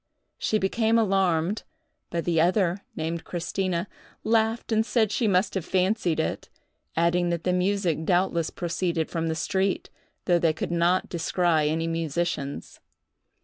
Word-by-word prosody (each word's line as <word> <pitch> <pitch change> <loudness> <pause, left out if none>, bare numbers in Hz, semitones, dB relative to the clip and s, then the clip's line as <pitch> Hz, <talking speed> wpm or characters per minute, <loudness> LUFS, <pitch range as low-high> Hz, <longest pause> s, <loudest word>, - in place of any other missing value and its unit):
She 215 - +1
became 220 +3 +2
alarmed; 195 -3 +2 0.5
but 170 -1 -2
the 165 -2 +2
other, 180 +1 +2 0.2
named 165 +1 -3
Christina, 175 +1 -2 0.4
laughed 225 +1 +1
and 220 0 +3
said 220 -2 +1
she 225 - +1
must 185 0 +2
have 190 - -2
fancied 185 -3 +1
it, 160 - -2 0.5
adding 170 +1 +2
that 170 -1 -2
the 180 - +1
music 180 -3 0
doubtless 175 -1 +1
proceeded 170 -2 -2
from 165 -1 -1
the 160 - -1
street, 190 +5 -1 0.3
though 175 -1 +3
they 165 -2 +2
could 155 - -4
not 175 +2 +2
descry 165 -2 +1
any 165 +1 -1
musicians. 165 -3 -3
175 Hz, 145 wpm, -26 LUFS, 165-195 Hz, 0.5 s, and